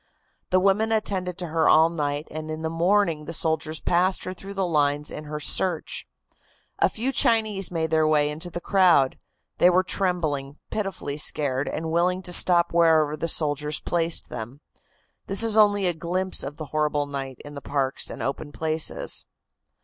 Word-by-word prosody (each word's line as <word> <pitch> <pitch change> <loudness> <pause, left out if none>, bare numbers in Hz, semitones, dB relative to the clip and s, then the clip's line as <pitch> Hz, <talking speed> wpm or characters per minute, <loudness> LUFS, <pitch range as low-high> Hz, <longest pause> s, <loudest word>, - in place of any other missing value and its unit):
The 185 - +3
women 200 +4 +2
attended 190 -5 -1
to 175 - -5
her 160 0 +2
all 160 +1 +5
night 145 -2 -3
and 155 0 -6
in 155 +1 -5
the 160 - -2
morning 170 -2 +1
the 165 - -3
soldiers 160 -1 -1
passed 180 +2 +1
her 185 - -5
through 195 +2 -10
the 195 -1 0
lines 145 -3 0
in 150 - -7
her 150 0 -5
search. 165 +2 +2 0.7
A - - +4
few 245 +5 -2
Chinese 220 -6 +2
made 160 -2 -2
their 155 -1 +3
way 150 -1 +2
into 160 +4 -6
the 175 - -5
crowd. 175 -8 +3 0.4
They 175 - +6
were 180 +1 +3
trembling, 155 -8 -2
pitifully 195 -8 -4
scared 140 -3 -1
and 160 +1 -4
willing 180 +3 +1
to 180 - -2
stop 175 -1 +3
wherever 160 -3 +3
the 160 +2 -3
soldiers 150 -1 0
placed 170 -1 -1
them. 120 +5 -8 0.7
This 195 +3 +5
is 225 -2 +3
only 205 -2 +4
a 175 - +2
glimpse 180 +3 -2
of 145 +3 -6
the 155 - -6
horrible 150 -1 0
night 135 -2 -6
in 145 - -10
the 140 - -8
parks 140 -2 -2
and - - -6
open 140 +2 -4
places. 160 +1 -1
160 Hz, 180 wpm, -24 LUFS, 150-185 Hz, 0.7 s, They